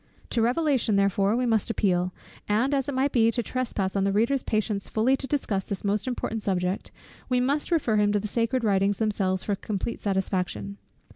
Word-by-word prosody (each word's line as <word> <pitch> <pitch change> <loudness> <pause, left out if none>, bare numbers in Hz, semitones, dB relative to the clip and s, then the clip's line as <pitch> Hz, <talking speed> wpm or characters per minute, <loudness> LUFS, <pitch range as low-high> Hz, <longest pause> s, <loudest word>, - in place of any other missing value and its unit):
To 235 - +2
Revelation 250 -2 +2
therefore 200 +1 +2
we 250 +1 +1
must 225 -3 +1
appeal; 180 -5 +1 0.4
and 235 +7 +2
as 275 0 0
it 280 - -3
might 270 +2 +1
be 230 -2 +4
to 240 +1 -1
trespass 215 -7 -2
on 195 - +2
the 195 - +2
reader's 235 +7 +2
patience 215 -3 -1
fully 235 +5 +2
to 270 - -4
discuss 220 -9 -1
this 195 0 -5
most 205 +3 0
important 225 -3 -3
subject, 185 -1 -1 0.4
we 250 -1 +2
must 280 +4 0
refer 285 -11 +2
him 205 0 +3
to 205 - +2
the 210 - -4
sacred 235 +3 0
Writings 200 -1 +2
themselves 195 -4 0
for 205 - -1
complete 205 +3 -4
satisfaction. 190 0 -2
215 Hz, 195 wpm, -26 LUFS, 200-250 Hz, 0.4 s, be